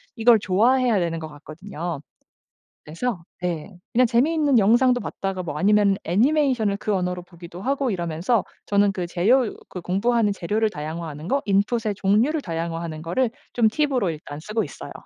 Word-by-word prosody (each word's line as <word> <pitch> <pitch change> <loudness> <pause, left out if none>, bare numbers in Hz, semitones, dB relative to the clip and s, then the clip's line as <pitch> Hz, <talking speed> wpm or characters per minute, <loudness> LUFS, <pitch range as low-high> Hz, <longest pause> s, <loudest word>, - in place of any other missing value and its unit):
이걸 225 -1 +5
좋아해야 230 +3 +3
되는 165 -1 -1
것 160 - -6
같거든요. 160 +1 -7 0.8
그래서 175 +4 -3 0.2
네, 175 -2 -4 0.2
그냥 250 +2 +4
재미있는 285 +1 +3
영상도 245 +4 +4
봤다가 195 -1 -4
뭐 150 -3 -5
아니면 200 +1 +3
애니메이션을 235 - +2
그 210 0 -2
언어로 180 -1 -2
보기도 175 0 -11
하고 275 +2 0
이러면서 175 +5 0 0.2
저는 200 0 +3
그 180 -3 -3
재료 220 +8 +2 0.2
그 180 - -7
공부하는 210 +4 +1
재료를 210 +4 0
다양화하는 155 -1 -6
거 275 +4 +1
input의 205 +2 +1
종류를 225 +11 +2
다양화하는 165 -2 -4
거를 225 +9 0 0.2
좀 230 -2 +3
팁으로 255 - +1
일단 150 -1 -8
쓰고 215 +7 -2
있어요. - - -9
200 Hz, 390 characters per minute, -23 LUFS, 170-240 Hz, 0.8 s, 이걸